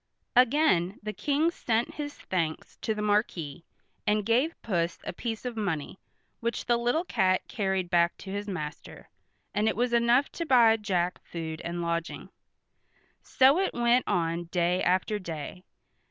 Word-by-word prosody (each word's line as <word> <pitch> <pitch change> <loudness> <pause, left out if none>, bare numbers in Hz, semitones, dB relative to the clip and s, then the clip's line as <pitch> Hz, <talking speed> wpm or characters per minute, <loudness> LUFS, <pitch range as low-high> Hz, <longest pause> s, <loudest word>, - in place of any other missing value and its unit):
Again 245 - +3
the 215 0 -4
King 300 +7 +1
sent 235 -7 -1
his 290 -1 -5
thanks 165 -4 -3
to 220 - -2
the 210 - -3
Marquis, 180 -8 0 0.4
and 210 -1 +2
gave 250 +9 +1
Puss 175 -5 -1
a - - -5
piece 225 +5 -5
of 245 -2 -3
money, 190 -6 -3 0.4
which 235 0 -2
the 240 - +3
little 245 +8 +1
cat 185 - +1
carried 190 -4 -1
back 170 0 +3
to 190 - -9
his 205 +1 -4
master, 155 -6 -7 0.4
and 210 +1 +1
it - - +1
was 240 +1 0
enough 235 +3 +3
to 335 - -4
buy 235 -5 +6
Jack 180 -4 -1
food 160 -2 -6
and 170 0 -4
lodging. 170 0 -3 0.9
So 270 +6 +4
it 385 - 0
went 240 +1 +3
on 170 0 0
day 175 +1 0
after 185 +4 +1
day. 170 0 -7
205 Hz, 155 wpm, -28 LUFS, 175-240 Hz, 0.9 s, buy